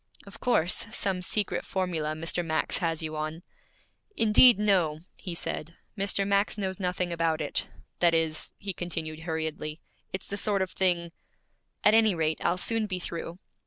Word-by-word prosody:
'Of 200 - -12
course, 190 -6 +2
some 195 -4 0
secret 205 +2 -1
formula 170 -5 -1
Mr. 165 +2 -1
Max 160 -1 0
has 165 -2 -1
you 155 0 -3
on.' 155 +2 -4 0.7
'Indeed, 225 +2 +7
no,' 180 -7 +2 0.2
he 180 -3 -6
said. 165 0 -4 0.2
'Mr. 200 0 +2
Max 200 +1 +2
knows 190 -2 -2
nothing 180 -1 -1
about 165 -1 +1
it 150 - -1 0.3
that 170 -1 +4
is,' 160 -1 +1
he 195 -1 -4
continued 160 -3 -4
hurriedly, 160 -1 -4 0.3
'it's 190 - -5
the 200 - -5
sort 200 -2 +1
of 185 - -5
thing 175 -3 +1 0.7
At 210 - +6
any 220 -3 +5
rate, 160 -1 0
I'll 175 - +2
soon 225 +3 +1
be 185 -2 -2
through.' 170 -1 -6
175 Hz, 160 wpm, -28 LUFS, 160-195 Hz, 0.7 s, Indeed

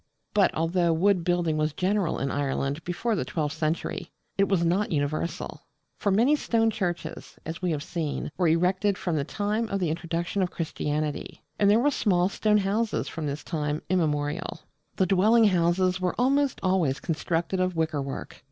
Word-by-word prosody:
But 205 -2 +4
although 170 +2 +2
wood 180 +2 +3
building 175 -3 +1
was 155 0 0
general 190 0 0
in 135 0 -2
Ireland 140 +2 -1
before 180 +7 -1
the 185 - -1
twelfth 155 -2 -2
century, 160 +1 -2 0.3
it 200 0 +2
was 180 -4 +2
not 190 +5 +1
universal: 155 +3 -2 0.3
for 205 - -1
many 235 +10 +4
stone 225 -5 +1
churches, 180 -5 -4
as 165 +2 -5
we 180 - 0
have 150 -3 -1
seen, 155 -4 -3
were 180 -2 +2
erected 185 +4 +2
from 175 -3 -2
the 145 - +1
time 210 +7 -1
of 195 - -1
the 175 -4 0
introduction 170 +3 -2
of 185 - +1
Christianity; 150 -3 -3 0.2
and 200 - +5
there 210 +2 +5
were 290 +4 +3
small 185 -8 +2
stone 210 +1 +2
houses 210 +3 0
from 155 -3 -3
time 150 -1 -3
immemorial. 150 -3 -1 0.3
The 190 - +2
dwelling 215 +5 +4
houses 180 +1 +2
were 180 -1 0
almost 275 +2 +2
always 180 -8 +2
constructed 165 +2 -1
of 185 -1 0
Wickerwork. 150 -4 -3
175 Hz, 170 wpm, -27 LUFS, 155-200 Hz, 0.3 s, and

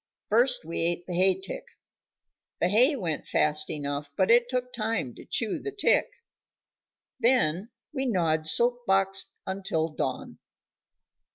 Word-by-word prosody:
First 240 -2 +2
we 165 - -4
ate 175 +1 0
the 180 - -5
hay 185 +1 +3
tick; 190 - -6 1.0
the 175 - +2
hay 250 +9 +4
went 170 - -3
fast 150 0 +1
enough, 145 -1 -4
but 190 +3 +3
it 240 +1 +5
took 250 0 -2
time 220 - -2
to - - -13
chew 225 -3 -1
the 415 - -5
tick. 410 0 +2 1.1
Then 230 -6 +2 0.2
we 265 -2 -1
gnawed 160 -7 +1
soap 245 +7 +2
box 195 0 +2 0.2
until 190 -4 -2
dawn. 155 - -4
195 Hz, 140 wpm, -27 LUFS, 165-240 Hz, 1.1 s, it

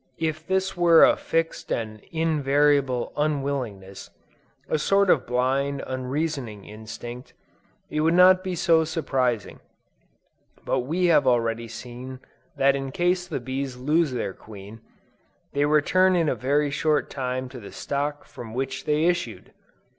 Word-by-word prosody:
If 160 0 -3
this 190 0 0
were 170 -2 +6
a - - +4
fixed 165 0 -2
and 110 -2 -3
invariable 145 -5 +1
unwillingness, 135 -10 -3 0.6
a 155 - 0
sort 195 +4 +3
of - - +1
blind, 135 +3 0
unreasoning 130 -4 -3
instinct, 110 +3 -9 0.6
it 155 - -1
would 165 +2 +3
not 185 +1 +6
be 185 -1 -3
so 165 -2 +3
surprising, 130 -8 -1 1.1
but - - +1
we 165 +9 -1
have 150 -6 +4
already 115 -1 +1
seen 125 +3 -9 0.4
that 135 0 +4
in 135 -1 -4
case 180 +3 0
the - - -3
bees 130 +1 -4
lose 150 +4 +1
their 120 -6 -3
queen, 105 +2 -12 0.7
they 145 +1 +2
return 180 +5 +3
in 165 -3 +2
a - - +1
very 145 +2 0
short 150 +1 0
time 130 -1 -3
to 130 -1 -9
the 100 - -11
stock 145 +1 -3
from 115 -1 -10
which 130 +1 -3
they 150 +1 +1
issued! 175 -10 -2
140 Hz, 140 wpm, -25 LUFS, 125-160 Hz, 1.1 s, were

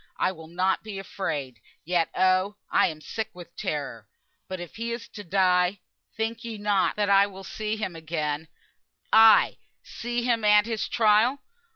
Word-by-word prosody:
I - - +1
will 160 -3 -11
not 185 +3 0
be 215 -2 -7
afeared. 150 - -4 0.3
Yet, 170 -1 +1
oh! 185 +2 +2 0.2
I - - +4
am 155 -2 -6
so - - -16
sick 220 -1 -4
with 175 -1 -12
terror. 115 -8 -4 0.4
But 185 -1 -5
if 175 +2 -9
he 230 +1 -3
is 235 0 -5
to 205 - -9
die, 180 0 +2 0.4
think 225 +1 -2
ye 230 -2 -6
not 205 -1 +1
that 210 -1 0
I 200 0 +6
will 195 -1 -11
see 215 +2 -3
him 190 -5 -4
again; 160 -1 -3 0.7
ay! 220 0 +7 0.3
see 240 0 -4
him 235 -2 +1
at 210 0 +5
his 225 -2 -2
trial? 225 +5 +3
195 Hz, 175 wpm, -26 LUFS, 175-220 Hz, 0.7 s, ay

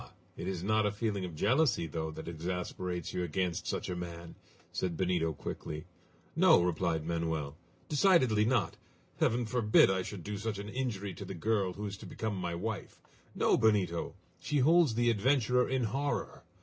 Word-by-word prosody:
It - - -6
is 90 -2 -3
not 110 +1 +2
a - - 0
feeling 100 -2 -2
of 85 -3 -7
jealousy, 125 - +2
though, 80 0 -3
that 80 +1 -8
exasperates 90 +1 -4
you - - -1
against 90 +1 -2
such - - -2
a 90 - -3
man?" 85 -1 -7 0.4
said 85 -3 -2
Benito 90 -3 +1
quickly. 75 +1 -6 0.5
"No!" - - +6
replied 85 -2 0
Manoel. 80 -3 -2 0.3
"Decidedly 140 - +4
not! 120 +2 +1 0.4
Heaven 120 +1 +2
forbid 110 -4 +4
I 95 -1 0
should 90 -1 -7
do 105 -1 -4
such 110 -1 -3
an 100 +1 -6
injury 105 -6 -3
to - - -8
the 95 - -6
girl 100 0 0
who 105 +3 -6
is 100 -1 -5
to - - -10
become 110 -2 -3
my 90 -2 -3
wife. 105 +4 -5 0.4
No, - - +3
Benito! 95 -7 +1 0.2
She 150 +9 -1
holds 155 -2 +5
the 120 0 +3
adventurer 125 +2 +2
in 130 -1 +1
horror! 135 +6 -2
100 Hz, 175 wpm, -32 LUFS, 85-115 Hz, 0.5 s, No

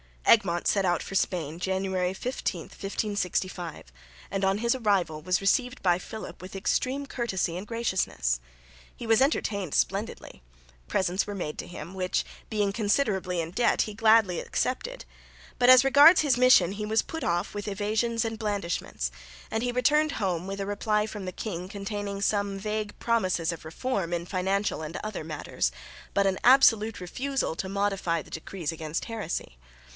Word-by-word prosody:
Egmont 175 -6 +4
set 195 -2 +2
out 175 -2 +1
for - - -8
Spain, 170 -4 -1
January 190 0 -1
15, 190 -4 -3
1565, 185 - -3 0.4
and 195 0 0
on 195 +1 +2
his 235 +1 +2
arrival 200 -10 0
was 180 +4 0
received 250 +7 +1
by 175 -1 +3
Philip 215 -1 -8
with 185 +1 -9
extreme 260 +8 0
courtesy 195 -10 -2
and 195 +3 -7
graciousness. 190 - 0 0.6
He - - -8
was 225 +1 +4
entertained 200 - 0
splendidly; 200 +3 -2 0.5
presents 185 - 0
were 205 - -4
made 155 -5 -4
to - - -5
him, 175 0 -8
which, 185 -1 0 0.3
being 205 -2 +1
considerably 200 -4 0
in 165 0 -5
debt, 235 +6 +2
he 215 - -6
gladly 220 -4 +4
accepted; - - -2 0.6
but 245 0 +5
as 255 0 +9
regards 285 +6 +8
his 280 -5 +2
mission 250 -8 +6
he 210 +1 -4
was 220 +1 +2
put 320 - -5
off 175 0 0
with 205 0 -5
evasions 215 +3 0
and 225 -1 -4
blandishments, 195 - -2 0.4
and 220 - 0
he 245 - 0
returned 295 +5 +3
home 185 -3 -1
with 195 0 -4
a - - -2
reply 210 +1 0
from 210 -2 -6
the 185 - -5
king 180 -4 -5
containing 200 0 -4
some 200 -1 0
vague 210 +1 -3
promises 185 -8 +1
of 165 -1 -8
reform 180 +1 -2
in 170 0 -2
financial 190 +1 -1
and 155 +2 -5
other 215 -7 -5
matters, 150 - -2 0.4
but 200 - +3
an 190 -1 +1
absolute 225 -5 +5
refusal 270 +6 -2
to 190 +3 -4
modify 195 -4 0
the - - -16
decrees 165 0 -4
against 160 0 -4
heresy. 205 - -4
200 Hz, 165 wpm, -27 LUFS, 180-225 Hz, 0.6 s, as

